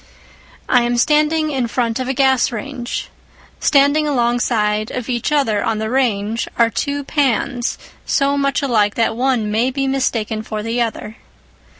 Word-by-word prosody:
I 250 Hz, -, +4 dB
am 240 Hz, 0 st, 0 dB
standing 305 Hz, +3 st, +2 dB
in 260 Hz, -4 st, -1 dB
front 230 Hz, 0 st, -1 dB
of 255 Hz, -, -3 dB
a 265 Hz, -, 0 dB
gas 265 Hz, -1 st, +3 dB
range. 245 Hz, +2 st, -5 dB, 0.5 s
Standing 285 Hz, +2 st, +3 dB
alongside 235 Hz, -5 st, 0 dB
of 250 Hz, -1 st, -5 dB
each 245 Hz, +3 st, -1 dB
other 225 Hz, -9 st, +1 dB
on 225 Hz, -, 0 dB
the 220 Hz, +1 st, -3 dB
range 230 Hz, -4 st, 0 dB
are 230 Hz, -1 st, +3 dB
two 285 Hz, +7 st, -2 dB
pans 265 Hz, -3 st, 0 dB, 0.3 s
so 280 Hz, 0 st, +1 dB
much 275 Hz, 0 st, 0 dB
alike 215 Hz, -6 st, +2 dB
that 225 Hz, -1 st, +1 dB
one 245 Hz, -4 st, 0 dB
may 230 Hz, +4 st, +1 dB
be 270 Hz, +1 st, -2 dB
mistaken 230 Hz, -5 st, -1 dB
for 215 Hz, -1 st, -5 dB
the 230 Hz, +2 st, -1 dB
other. 225 Hz, -1 st, -4 dB
245 Hz, 160 wpm, -18 LUFS, 225-275 Hz, 0.5 s, I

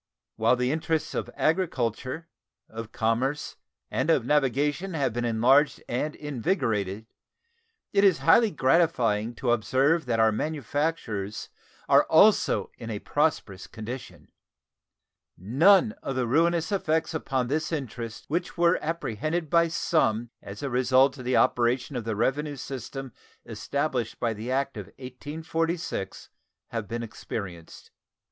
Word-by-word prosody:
Whilst 115 Hz, +3 st, +3 dB
the 125 Hz, +1 st, 0 dB
interests 160 Hz, 0 st, -1 dB
of -, -, -3 dB
agriculture, 155 Hz, -, -1 dB, 0.4 s
of 110 Hz, 0 st, -8 dB
commerce, 125 Hz, +6 st, -1 dB, 0.3 s
and 130 Hz, +5 st, -1 dB
of 135 Hz, -8 st, +3 dB
navigation 150 Hz, +6 st, +1 dB
have 135 Hz, -6 st, 0 dB
been 120 Hz, +1 st, -2 dB
enlarged 125 Hz, +6 st, +3 dB
and 150 Hz, +5 st, -2 dB
invigorated, 115 Hz, -, -2 dB, 0.9 s
it 200 Hz, 0 st, +4 dB
is 190 Hz, -5 st, +5 dB
highly 220 Hz, +8 st, +6 dB
gratifying 130 Hz, -, +2 dB
to 120 Hz, +1 st, 0 dB
observe 135 Hz, +7 st, +2 dB
that 115 Hz, -2 st, 0 dB
our 110 Hz, 0 st, +5 dB
manufactures 140 Hz, -6 st, -3 dB, 0.4 s
are -, -, +5 dB
also -, -, +4 dB
in 115 Hz, -, -7 dB
a 105 Hz, -, -3 dB
prosperous 110 Hz, -8 st, -1 dB
condition. 120 Hz, +4 st, -8 dB, 1.1 s
None 170 Hz, -, +4 dB
of 135 Hz, -, -4 dB
the 130 Hz, -1 st, 0 dB
ruinous 165 Hz, -, +2 dB
effects 160 Hz, -4 st, 0 dB
upon 135 Hz, -5 st, -1 dB
this 150 Hz, +4 st, -1 dB
interest 120 Hz, -6 st, -5 dB
which 175 Hz, +4 st, -3 dB
were 170 Hz, +1 st, +3 dB
apprehended 155 Hz, +1 st, -3 dB
by 170 Hz, 0 st, +5 dB
some 120 Hz, -8 st, 0 dB
as 100 Hz, +1 st, -9 dB
the 140 Hz, -3 st, -3 dB
result 130 Hz, +2 st, +3 dB
of 125 Hz, -, -8 dB
the 125 Hz, -, +2 dB
operation 125 Hz, +3 st, +2 dB
of 120 Hz, -3 st, -3 dB
the 110 Hz, -2 st, -2 dB
revenue 145 Hz, +6 st, 0 dB
system 135 Hz, 0 st, -7 dB, 0.3 s
established 135 Hz, -6 st, -3 dB
by 115 Hz, -2 st, 0 dB
the 110 Hz, +3 st, -6 dB
act 135 Hz, -1 st, -1 dB
of 100 Hz, -4 st, -6 dB
1846 160 Hz, -, -4 dB, 0.4 s
have 115 Hz, -3 st, -4 dB
been 115 Hz, +3 st, -4 dB
experienced. 95 Hz, -6 st, -8 dB
130 Hz, 130 wpm, -26 LUFS, 115-160 Hz, 1.1 s, highly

